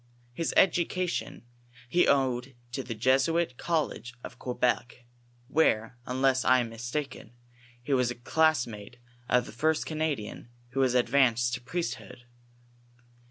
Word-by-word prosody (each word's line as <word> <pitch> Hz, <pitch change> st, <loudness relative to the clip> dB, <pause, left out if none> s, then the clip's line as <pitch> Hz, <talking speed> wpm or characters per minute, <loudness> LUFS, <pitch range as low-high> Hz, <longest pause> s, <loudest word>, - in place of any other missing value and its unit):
His 165 Hz, +6 st, -2 dB
education 180 Hz, -3 st, +1 dB, 0.5 s
ho 180 Hz, -, +5 dB
owed 130 Hz, -2 st, +1 dB, 0.2 s
to 135 Hz, -, -3 dB
the 120 Hz, -3 st, -6 dB
Jesuit 130 Hz, +6 st, +2 dB
college 155 Hz, -7 st, -2 dB
of 125 Hz, -, -9 dB
Quebec, 125 Hz, -1 st, -1 dB, 0.4 s
where, 125 Hz, -6 st, +2 dB
unless 130 Hz, 0 st, +2 dB
I 130 Hz, -, +5 dB
am 115 Hz, -, -4 dB
mistaken, 120 Hz, +1 st, -5 dB, 0.5 s
he 140 Hz, -, -1 dB
was 125 Hz, -2 st, +2 dB
a 120 Hz, -, -4 dB
class 155 Hz, +2 st, +2 dB
mate 105 Hz, +1 st, -10 dB, 0.3 s
of 125 Hz, 0 st, +3 dB
the -, -, -9 dB
first 160 Hz, 0 st, 0 dB
Canadian 155 Hz, -9 st, -3 dB, 0.2 s
who 130 Hz, +2 st, -4 dB
was 130 Hz, -2 st, +3 dB
advanced 120 Hz, -1 st, +3 dB
to 130 Hz, -, -2 dB
the 120 Hz, -, -25 dB
priesthood. 165 Hz, -7 st, -4 dB
130 Hz, 135 wpm, -28 LUFS, 120-155 Hz, 0.5 s, ho